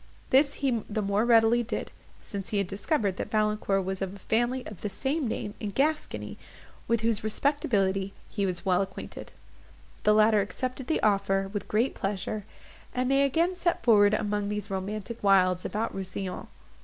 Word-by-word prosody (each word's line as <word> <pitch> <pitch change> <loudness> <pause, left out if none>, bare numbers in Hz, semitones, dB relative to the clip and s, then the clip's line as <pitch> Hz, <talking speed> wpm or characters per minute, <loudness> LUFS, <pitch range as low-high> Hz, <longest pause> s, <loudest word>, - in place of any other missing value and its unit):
This 280 +2 +4
he 240 -4 +2
the 215 0 -1
more 200 +3 +1
readily 230 0 +5
did, 235 - -4 0.3
since 200 -2 -5
he 210 - 0
had 200 - +2
discovered 200 - -1
that - - -4
Valancourt 210 -3 +1
was 190 0 -3
of 195 0 -3
a - - -10
family 240 +5 0
of 210 - -9
the 210 - -2
same 270 +8 -1
name 210 -2 -3
in 210 - -3
Gascony, 300 +9 -1 0.5
with 230 -1 +2
whose 225 -2 0
respectability 205 -6 0 0.2
he 200 -3 -1
was 180 0 -3
well 185 0 +3
acquainted. 190 -1 -7 0.7
The 210 - +4
latter 215 -1 +5
accepted 255 +6 -4
the 320 - 0
offer 195 -2 +2
with 205 - -4
great 230 +5 +1
pleasure, 195 +1 -3 0.5
and 255 +1 +1
they 275 0 +4
again 330 +7 +2
set 350 -1 0
forward 210 -3 +5
among 210 -1 -1
these 210 -1 -3
romantic 210 +4 -4
wilds 185 -2 +4
about 220 +2 -2
Rousillon. 190 -1 -5
210 Hz, 170 wpm, -28 LUFS, 195-240 Hz, 0.7 s, readily